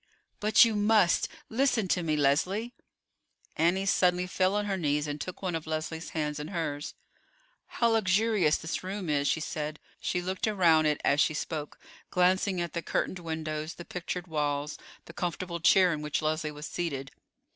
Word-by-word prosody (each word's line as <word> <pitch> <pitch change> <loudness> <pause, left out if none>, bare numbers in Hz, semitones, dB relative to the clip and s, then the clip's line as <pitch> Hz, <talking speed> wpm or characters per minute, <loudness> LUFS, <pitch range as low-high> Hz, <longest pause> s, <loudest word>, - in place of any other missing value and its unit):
"But 215 +2 +6
you 225 -2 0
must. 205 -3 +3 0.2
Listen 235 -4 +1
to 180 - +2
me, 155 -2 0
Leslie." 185 - +1 0.8
Annie 175 +4 +2
suddenly 180 -2 +3
fell 185 +2 +1
on 210 0 0
her 200 -1 -1
knees 150 -4 0
and 145 0 -4
took 185 +1 -7
one 185 -2 -1
of 160 -1 -4
Leslie's 160 +1 -4
hands 150 -2 -2
in 150 - -5
hers. 155 -5 -4 0.7
"How 235 - +1
luxurious 210 -5 +3
this 160 +3 -4
room 190 -3 -3
is," 145 -1 +1
she 160 - +1
said. 155 0 -4 0.2
She 180 - -1
looked 185 +4 -2
around 170 -7 +4
it 150 -1 +1
as 145 +2 +4
she 155 - +2
spoke, 150 0 -4 0.3
glancing 185 +1 +2
at 170 -2 -3
the 170 - -2
curtained 185 - -2
windows, 160 -1 -4
the 175 - -9
pictured 180 0 -4
walls, 150 -3 -2 0.3
the 170 - -11
comfortable 175 0 -3
chair 180 +1 +5
in 150 - -4
which 150 +1 -2
Leslie 155 0 0
was 150 0 -8
seated. 140 -7 -4
170 Hz, 175 wpm, -29 LUFS, 150-185 Hz, 0.8 s, But